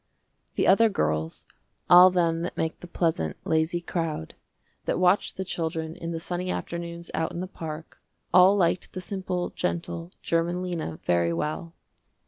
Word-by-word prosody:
The - - +2
other 225 +4 +6
girls, 80 - -1 0.4
all 180 +1 +9
them 170 -2 +1
that 175 - -4
make 160 0 -2
the 175 - -10
pleasant, 160 - -1
lazy 160 +2 +1
crowd, 165 - -3 0.5
that - - 0
watch 180 +2 +3
the 190 - -4
children 160 -2 -3
in 170 -2 -6
the 165 -1 -3
sunny 180 +2 -3
afternoons 170 -1 -5
out 160 - -1
in - - -5
the 185 - -2
park, 160 -3 -8 0.3
all 185 +2 +7
liked 180 -2 +1
the 185 - -4
simple, 180 -1 -3
gentle, 170 -1 -3
german 170 +2 0
Lena 165 - -3
very 85 -1 +2
well. 155 - -3
170 Hz, 155 wpm, -26 LUFS, 160-180 Hz, 0.5 s, all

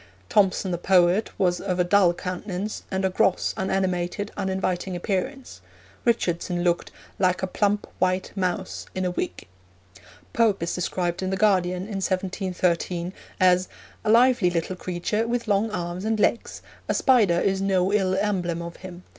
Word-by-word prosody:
Thomson, 195 -2 +2
the 175 - -2
poet, 180 +3 +3
was 180 -2 +1
of 185 -2 -2
a - - +5
dull 180 0 +4
countenance, 185 +3 -4
and 190 0 -1
a - - +3
gross, 185 - +1
unanimated, 190 +1 -1
uninviting 190 -1 -2
appearance; 210 +9 -3 0.4
Richardson 175 -6 0
looked 175 -1 +1 0.3
'like 185 0 +2
a - - +4
plump 205 +2 0
white 185 0 0
mouse 185 -1 -2
in 185 0 -1
a 180 - 0
wig.' 90 - -4 0.9
Pope 210 -6 +2
is 170 - -2
described 175 0 -2
in 185 - -1
the 190 - -1
Guardian, 185 -3 +2
in 200 -1 -4
1713, 185 -2 -1 0.3
as 180 -1 +4 0.4
'a 215 - -1
lively 235 -4 +5
little 175 +1 -2
creature, 185 +5 -2
with 235 0 -2
long 205 +2 +2
arms 175 -2 -4
and 220 0 0
legs: 230 - 0 0.3
a - - +1
spider 215 -10 +4
is 195 +1 +1
no 190 0 +1
ill 190 -3 +2
emblem 185 -4 -1
of 170 0 -8
him. 185 -1 -10
185 Hz, 155 wpm, -25 LUFS, 180-200 Hz, 0.9 s, a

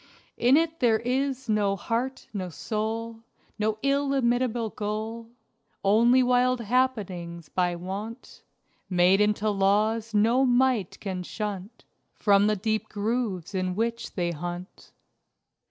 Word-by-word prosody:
In 250 +4 +5
it 325 0 0
there 230 -4 +4
is 260 +2 -2
no 205 -2 +2
Heart 240 +6 -3
no 185 -3 -3
Soul 225 +5 -4 0.4
No 215 0 0
illimitable 255 -5 +1
Goal 220 +2 -4 0.5
Only 235 +6 +5
wild 250 0 +3
happenings, 200 - -1
by 180 -1 0
wont 200 +7 -7 0.5
Made 180 +2 +4
into 210 0 +2
laws 210 +3 +1
no 225 +5 +3
might 250 -5 +2
can 190 -3 -4
shunt 205 +3 -6 0.3
From 200 0 +4
the 215 - +2
deep 215 +2 -2
grooves 205 -4 -2
in 185 -1 -1
which 230 +2 -2
they 175 -2 0
hunt. 175 +3 -7
215 Hz, 120 wpm, -26 LUFS, 195-245 Hz, 0.5 s, In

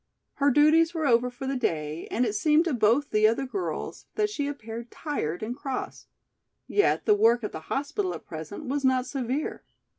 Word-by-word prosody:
Her 285 - +5
duties 315 +4 +4
were 320 -2 -1
over 245 -1 +3
for 245 +2 -8
the 270 +1 -1
day 155 - -2
and 245 - +1
it 215 - -1
seemed 305 +9 +3
to 335 - 0
both 240 +5 +2
the 215 0 +5
other 230 +5 0
girls 360 +9 -4
that 420 -1 +1
she 290 -8 -2
appeared 235 -4 -6
tired 215 - -3
and 235 +3 -3
cross. 270 -2 -5 0.6
Yet 410 - +2
the 425 - +5
work 240 - +4
at 210 - -3
the - - -6
hospital 315 +8 -1
at - - -10
present 160 - -7
was 280 +2 -2
not 260 -1 +3
severe. 265 +2 -3
260 Hz, 190 wpm, -27 LUFS, 230-295 Hz, 0.6 s, Her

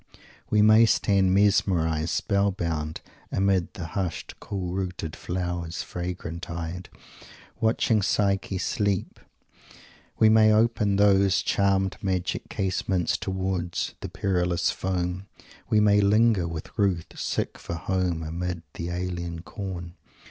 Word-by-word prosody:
We 105 -1 +4
may 110 +2 +7
stand 100 -4 +3
mesmerized, 85 -5 +2
spell 100 +2 +1
bound, 80 -4 -3 0.3
amid 95 0 +1
"the 90 -5 -5
hushed 90 0 -4
cool 90 -3 -4
rooted 90 -4 -4
flowers, 85 -2 -3
fragrant 90 -1 -5
eyed" 85 +2 -5 0.7
watching 110 -1 +2
Psyche 100 -1 0
sleep. 100 0 -1 1.0
We 110 - +5
may 110 0 +6
open 105 -2 +2
those 100 -1 +4
"charmed 95 -1 +1
magic 95 -3 -2
casements" 95 -2 0
towards 95 -2 -2
"the - - -6
perilous 90 -3 0
foam." 90 0 -3 0.4
We 110 - +4
may 105 -1 +5
linger 105 -2 +3
with 80 -2 -7
Ruth 95 -5 0
"sick - - -2
for 85 - -5
home 90 -1 -1
amid 85 +1 -4
the 85 - -5
alien 85 -1 -4
corn." 90 -5 -6
95 Hz, 120 wpm, -26 LUFS, 85-100 Hz, 1.0 s, may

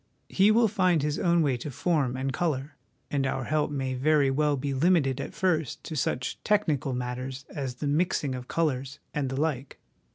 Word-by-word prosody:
He 195 +2 +4
will 225 +1 +5
find 185 -7 +2
his 150 0 -1
own 170 -2 +3
way 135 -4 +1
to 120 - -6
form 140 -3 0
and 135 +1 -2
colour, 150 -3 -2 0.4
and 140 -2 +1
our 130 - -2
help 150 +3 0
may 135 -3 -2
very 140 +1 +3
well 145 +1 +1
be 140 +1 -2
limited 140 -3 +2
at - - -7
first 160 -7 0
to 160 - -6
such 125 -2 -2
technical 155 -11 +1
matters 125 +2 -4
as 135 -4 -4
the 145 - -4
mixing 150 -2 +1
of 125 -1 -6
colours 140 -4 -1 0.2
and 140 -3 -1
the 135 +1 -3
like. 145 -4 -2
145 Hz, 190 wpm, -27 LUFS, 130-160 Hz, 0.4 s, will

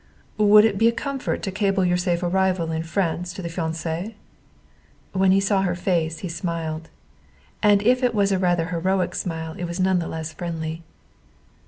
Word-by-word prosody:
"Would 210 0 +7
it 200 -3 +1
be 225 - +5
a - - +5
comfort 275 +2 -3
to 195 - -2
cable 195 -1 +1
your 180 0 +2
safe 180 -1 0
arrival 180 -2 +1
in 160 0 -1
France 175 0 -2
to 185 - -7
the 170 - -3
fiancé?" 165 +4 -3 1.0
When 190 0 +3
he 195 - +5
saw 195 0 +2
her 180 -2 0
face 170 -3 0
he - - -2
smiled. 165 -2 -4 0.7
And 205 -1 +4
if 250 +3 +3
it 245 -2 +1
was 200 -1 +2
a 190 - +1
rather 175 -2 +1
heroic 185 +2 0
smile 160 -2 -4
it 175 - -2
was 170 +1 -5
none 185 -1 +3
the 170 - -3
less 160 0 -5
friendly. 165 -2 -4
180 Hz, 185 wpm, -23 LUFS, 165-195 Hz, 1.0 s, Would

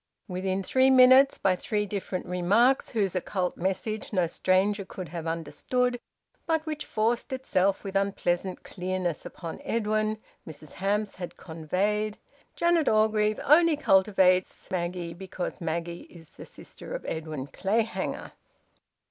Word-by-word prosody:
Within 190 0 -2
three 260 +7 +3
minutes, 260 +1 +7
by 185 -1 +2
three 210 +3 -2
different 195 -2 -4
remarks 200 +9 +2
whose 200 -6 -1
occult 185 0 -1
message 195 +4 -3
no 185 -4 +2
stranger 190 +4 +1
could 185 -3 -8
have 165 0 -5
understood 245 +9 -1 0.5
but 320 -1 +1
which 305 -1 -5
forced 230 +5 0
itself 200 -7 0
with 195 -1 -6
unpleasant 190 -2 -1
clearness 185 -3 -3
upon 165 -3 -8
Edwin, 215 -1 0 0.3
Mrs 155 -1 -11
Hamps 205 +2 -1
had 175 -2 -7
conveyed, 200 +6 -2 0.4
"Janet 340 -3 +3
Orgreave 215 0 +2
only 315 +1 +5
cultivates 190 -5 +2
Maggie 175 -1 -3
because 185 +1 -6
Maggie 170 +1 -4
is 165 -3 -14
the - - -11
sister - - -10
of - - -6
Edwin 155 -4 -4
Clayhanger." 220 +9 -2
195 Hz, 130 wpm, -27 LUFS, 180-220 Hz, 0.5 s, minutes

